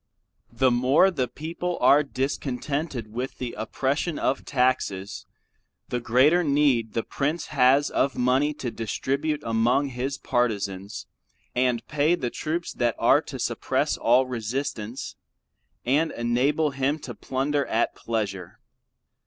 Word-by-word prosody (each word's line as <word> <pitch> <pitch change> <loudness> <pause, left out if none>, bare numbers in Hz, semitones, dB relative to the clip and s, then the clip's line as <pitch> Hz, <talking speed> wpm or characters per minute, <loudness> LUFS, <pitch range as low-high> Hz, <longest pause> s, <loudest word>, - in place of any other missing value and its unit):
The 130 -1 +2
more 130 +10 +4
the 130 -8 -1
people 170 +5 -4
are 140 +4 +6
discontented 135 -2 -3
with 125 +3 -4
the 125 -2 -4
oppression 140 +8 -2
of 135 - -1
taxes; 115 -7 -1 0.6
the 125 - -1
greater 130 +9 +4
need 140 -7 +2
the 115 - -1
prince 150 +4 -2
has 135 +1 +4
of 140 - 0
money 130 +4 +2
to 125 -5 -4
distribute 140 +7 -2
among 120 +5 +2
his 130 +2 -3
partizans 100 -5 -2 0.5
and 125 -2 +1
pay 150 +3 +2
the 125 -8 -3
troops 165 +2 -3
that 120 -2 0
are - - +4
to - - -8
suppress - - 0
all 125 +3 +3
resistance, 120 -1 -4 0.7
and 150 +6 +2
enable 135 +6 +1
him 135 +3 0
to 130 -5 -8
plunder 140 +4 -1
at 115 - +1
pleasure. 100 -6 -4
130 Hz, 130 wpm, -25 LUFS, 120-145 Hz, 0.7 s, are